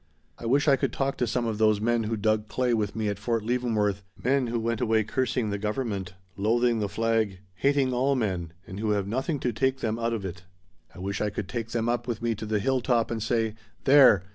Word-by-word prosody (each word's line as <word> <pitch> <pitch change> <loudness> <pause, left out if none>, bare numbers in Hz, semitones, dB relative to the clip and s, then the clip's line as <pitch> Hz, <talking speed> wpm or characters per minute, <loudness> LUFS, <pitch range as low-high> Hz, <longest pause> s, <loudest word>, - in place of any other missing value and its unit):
I 115 - -5
wish 140 +5 +3
I 140 -2 +6
could - - 0
talk 135 0 -1
to 125 - 0
some 120 +1 0
of 110 -2 -2
those 110 -2 +4
men 115 +1 +1
who 110 +1 -1
dug 110 0 +1
clay 125 +1 0
with 105 -3 -1
me 110 -1 -1
at 100 -1 -2
Fort 115 +1 -1
Leavenworth 110 -5 0 0.2
men 130 0 +2
who 115 0 -1
went 115 0 -1
away 110 -1 +3
cursing 125 -1 -1
the 100 - -2
government, 105 -4 -3 0.2
loathing 115 +3 +2
the 105 -2 -1
flag, 110 -3 0 0.2
hating 135 +5 +2
all 135 +3 +2
men, 95 -9 -1
and 95 +2 -8
who 110 0 -1
have 100 -2 0
nothing 130 - -1
to 120 - 0
take 130 +4 0
them 110 0 -1
out 115 0 0
of 105 -4 -3
it. 90 -1 -6 0.5
I - - -13
wish 95 +2 -3
I 105 - +1
could 100 -1 -5
take 115 +2 -4
them 115 0 -1
up 120 0 -1
with 115 -2 -2
me 115 -1 0
to 110 0 -6
the 110 0 +1
hill 130 +5 +1
top 120 -2 +1
and 115 -1 -2
say 115 0 0 0.3
'There! 135 -9 +7
115 Hz, 240 wpm, -27 LUFS, 105-125 Hz, 0.5 s, There